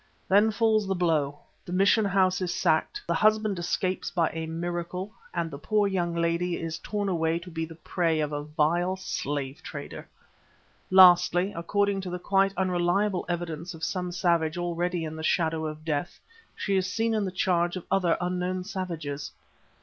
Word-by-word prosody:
Then 205 +3 +5
falls 215 -1 +2
the 195 - 0
blow; 155 -5 0 0.2
the - - -9
mission 200 +4 +4
house 190 -1 +2
is 180 -2 -1
sacked, 160 -2 +1
the 170 - 0
husband 215 +1 +2
escapes 185 +2 -1
by 170 -2 +1
a 160 0 -4
miracle 175 +4 -4 0.2
and 165 - -2
the 140 - -7
poor 205 +7 +1
young 175 -3 -1
lady 170 +1 0
is 165 0 -4
torn 205 -1 -3
away 165 -3 +1
to 175 +1 -9
be 160 0 -3
the 165 0 -11
prey 165 -1 0
of 150 -1 -1
a 145 0 -2
vile 160 +5 +1
slave 145 -7 -4
trader. - - -8 0.8
Lastly, 180 0 +6
according 200 +3 0
to 185 - -5
the 180 - -3
quite 195 +2 +2
unreliable 185 +1 +1
evidence 170 0 -4
of 160 - -11
some 180 -2 -2
savage 170 -2 +1
already 175 0 -1
in 160 0 -5
the 160 - -6
shadow 160 -1 +1
of 155 0 -8
death, 150 +1 -2 0.4
she 200 - -1
is 185 -1 0
seen 225 +2 0
in 215 -2 +1
the 190 - -1
charge 175 -1 +1
of 185 - -6
other 180 -4 +2
unknown 180 +1 -2
savages. 165 -7 -5
175 Hz, 175 wpm, -27 LUFS, 165-190 Hz, 0.8 s, Lastly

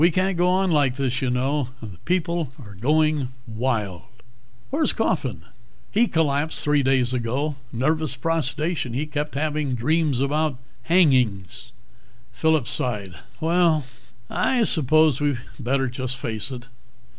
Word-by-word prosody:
"We 170 - +7
can't 185 +3 +1
go 175 +1 +2
on 185 0 +2
like 140 -5 +3
this, 130 -1 -1
you 130 - 0
know. 130 +2 0
The 100 -6 -10
people 170 -5 0
are 105 - -11
going 150 +6 +2 0.2
wild." 110 -6 -2 0.7
"Where's 305 +3 +1
Coffin?" - - -1 0.5
"He 230 +3 +3
collapsed 155 -3 0
three 145 -1 +3
days 130 -2 +2
ago. 130 +5 -1 0.2
Nervous 155 +4 0
prostration. 155 -1 -1
He 140 +5 -1
kept 150 -1 -4
having 150 -2 -1
dreams 150 +2 +1
about 145 +1 0 0.3
hangings." 125 - +2 0.6
Phillip 160 -5 +2
sighed. 105 -7 -3 0.3
"Well, 165 -3 +2 0.4
I 230 - +1
suppose 155 - +3
we'd 145 -3 +1 0.2
better 135 +2 0
just 130 +1 -4
face 110 -3 -1
it. 125 -2 -8
145 Hz, 135 wpm, -23 LUFS, 125-160 Hz, 0.7 s, We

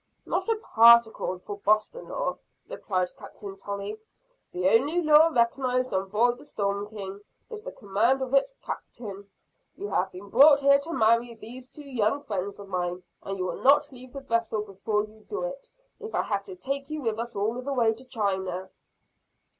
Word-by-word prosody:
"Not - - -1
a 455 - +3
particle 235 - +5
for 200 +3 -8
Boston 215 - +1
law," - - -2 0.3
replied 185 - -2
Captain 200 -2 -10
Tolley. 200 +2 -6 0.5
"The 180 +1 0
only 270 - +3
law 310 -1 +6
recognized 255 -2 +1
on 190 0 -1
board 240 +4 +2
the - - -14
Storm 200 -5 -2
King 200 -2 -7 0.3
is 425 -1 -7
the - - -6
command 225 - +1
of 260 0 -6
its 275 - +3
Captain. 200 -4 -7 0.5
You 405 +1 -6
have 190 +1 0
been 195 +2 -11
brought 285 +3 +7
here 280 0 +6
to 310 +4 -7
marry 230 -3 +2
these 245 +3 -11
two 295 - -12
young 255 +2 0
friends 200 -5 -4
of 200 - -10
mine; 180 -1 -3 0.2
and 195 0 -5
you 185 - -2
will - - -4
not 285 +2 +5
leave 255 -1 -12
the 275 - -6
vessel 230 -4 -1
before 210 +1 -2
you 215 0 -13
do 410 - -3
it - - -6 0.3
if 445 0 -6
I - - +1
have - - -2
to 390 -3 -9
take 275 -4 -4
you 305 -2 -4
with 225 -2 -1
us 235 0 -5
all 220 +5 -1
the 280 +2 -4
way 235 -4 +3
to 230 +4 -12
China." 190 -6 -2
230 Hz, 185 wpm, -27 LUFS, 200-275 Hz, 0.5 s, brought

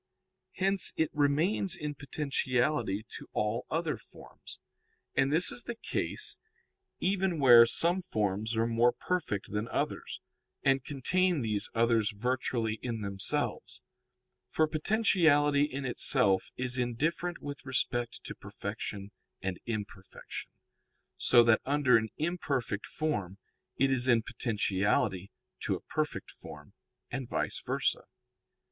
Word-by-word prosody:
Hence 195 0 +2
it 160 - +1
remains 160 +7 +1
in 150 -3 -4
potentiality 130 -6 -1
to - - -12
all 105 +2 -1
other 160 -1 -1
forms. - - -13 0.5
And 135 +1 +2
this 165 +4 +4
is 245 - -4
the 240 - -4
case - - -3 0.6
even 190 -2 +1
where 120 -4 +9
some 175 +9 +2
forms 110 - -1
are 115 - +3
more 115 +1 +3
perfect 160 - -3
than 105 +2 -2
others, - - -3 0.4
and 135 -1 +3
contain 170 +5 +1
these 105 -3 -1
others 115 -2 +3
virtually 120 -1 -1
in 115 -3 -3
themselves. 115 +5 -2 0.7
For 155 - +2
potentiality 155 -5 +3
in 140 -1 -5
itself 120 -5 +3
is 125 0 0
indifferent 160 +8 -1
with 145 -1 -7
respect 120 -2 -1
to - - -6
perfection 100 -1 -6 0.3
and 95 -1 -4
imperfection, 105 -4 -6 0.7
so 120 -1 +5
that 115 -1 +4
under 140 -3 +4
an 110 0 -2
imperfect 140 - -2
form 105 - -2 0.4
it 135 +1 +3
is 130 -1 +2
in 115 -3 +4
potentiality 100 -4 0 0.3
to - - -1
a - - -6
perfect - - -3
form, 75 -1 -12 0.4
and 135 -3 -4
_vice - - -2
versa. - - 0
125 Hz, 125 wpm, -30 LUFS, 110-150 Hz, 0.7 s, where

